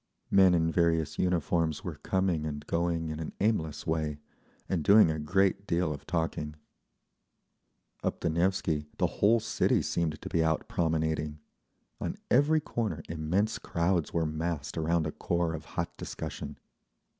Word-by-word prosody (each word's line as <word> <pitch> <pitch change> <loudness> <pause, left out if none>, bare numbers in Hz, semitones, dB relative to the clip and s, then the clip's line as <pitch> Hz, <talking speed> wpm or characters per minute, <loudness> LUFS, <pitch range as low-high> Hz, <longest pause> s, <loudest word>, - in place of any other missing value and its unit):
Men 95 -2 +6
in 80 -1 +2
various 80 -2 +1
uniforms 85 -3 +1
were - - -5
coming 95 -4 0
and 75 -1 -4
going 85 -1 0
in 80 0 -4
an 80 - -5
aimless 85 -8 0
way, 80 -2 -1 0.5
and 85 -5 -1
doing 100 -1 +7
a 80 - -3
great 95 +5 +1
deal 85 -3 +1
of 70 - -10
talking…. 80 -3 -2 1.5
Up - - -2
the 85 - +1
Nevsky 85 -3 0
the - - +2 0.2
whole 115 +3 +6
city 115 - +1
seemed 80 -2 -1
to - - -7
be 80 - +2
out 80 0 0
promenading. 80 -2 0 0.6
On - - -3 0.2
every 145 +5 +5
corner 110 - -3
immense 85 +7 0
crowds 85 -1 0
were 85 -1 +1
massed 80 -1 -3
around 80 0 +1
a 80 - -2
core 85 0 -1
of 80 - -6
hot - - -2
discussion. - - -6
80 Hz, 150 wpm, -30 LUFS, 80-90 Hz, 1.5 s, doing